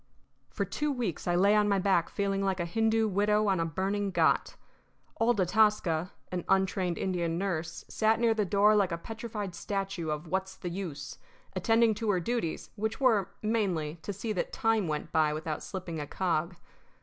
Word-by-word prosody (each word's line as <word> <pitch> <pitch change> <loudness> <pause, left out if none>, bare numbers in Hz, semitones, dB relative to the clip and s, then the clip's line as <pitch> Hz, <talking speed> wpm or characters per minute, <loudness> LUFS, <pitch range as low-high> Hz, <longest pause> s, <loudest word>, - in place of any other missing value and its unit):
For - - -2
two 300 0 -1
weeks 235 - -3
I 175 - +2
lay 200 +4 +5
on 210 0 +3
my 200 - +3
back 185 -3 +2
feeling 195 -1 -1
like 190 -1 0
a 175 - 0
Hindoo 225 +4 +2
widow 210 +1 +2
on 190 -3 +2
a 165 - +1
burning 195 +5 -1
ghat. - - +2 0.6
Old 225 -1 +3
Atasca, 185 -3 +2 0.2
an 180 -2 -2
untrained 190 -2 +1
Indian 170 -3 -1
nurse, 170 -4 -3
sat 220 0 +2
near 230 -1 +4
the 215 -1 +1
door 205 +2 +4
like 195 -3 +2
a 170 - -1
petrified 215 0 -6
statue 195 -3 -3
of 150 +1 -3
What's 190 +3 -2
the 185 -2 -5
Use, 155 -6 -6 0.4
attending 225 +4 +3
to 215 +1 -3
her 190 -3 +3
duties, 230 -4 -2
which 220 +1 -2
were, 225 -8 +3
mainly, 180 -8 0
to 205 - -4
see 210 +3 -3
that 185 - -2
time 225 -6 +1
went 150 -1 -3
by 155 -1 +3
without 155 0 -4
slipping 180 -4 -5
a 145 - -4
cog. 175 0 -1
195 Hz, 185 wpm, -30 LUFS, 175-215 Hz, 0.6 s, lay